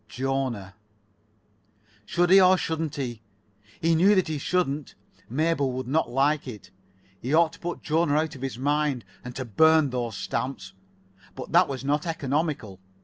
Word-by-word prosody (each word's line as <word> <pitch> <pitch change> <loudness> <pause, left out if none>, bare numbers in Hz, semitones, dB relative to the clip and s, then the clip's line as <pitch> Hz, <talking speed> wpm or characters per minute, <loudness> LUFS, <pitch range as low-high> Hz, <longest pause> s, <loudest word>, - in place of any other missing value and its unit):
Jona. 130 -7 -3 1.3
Should 175 +1 +1
he, 195 0 +8
or 185 0 +6
shouldn't 160 -2 -3
he? 120 -5 -4 0.6
He 165 +1 +3
knew 190 +6 +5
that 185 -4 +1
he 155 -2 -2
shouldn't. 150 -4 -1 0.3
Mabel 145 +1 +1
would 130 -1 -4
not 155 0 +1
like 140 +4 +1
it. 110 -7 -9 0.5
He 135 +6 0
ought 165 0 +4
to - - -14
put 175 0 -5
Jona 160 -1 +1
out 155 0 0
of 130 - -11
his 135 -4 -4
mind, 145 -2 0 0.2
and 125 0 -8
to 130 - -4
burn 155 +5 +4
those 120 -4 -3
stamps. 115 -6 -4 0.6
But - - -8
that - - +5
was 135 -1 -5
not 150 +4 0
economical. 145 - -2
145 Hz, 160 wpm, -26 LUFS, 125-160 Hz, 1.3 s, he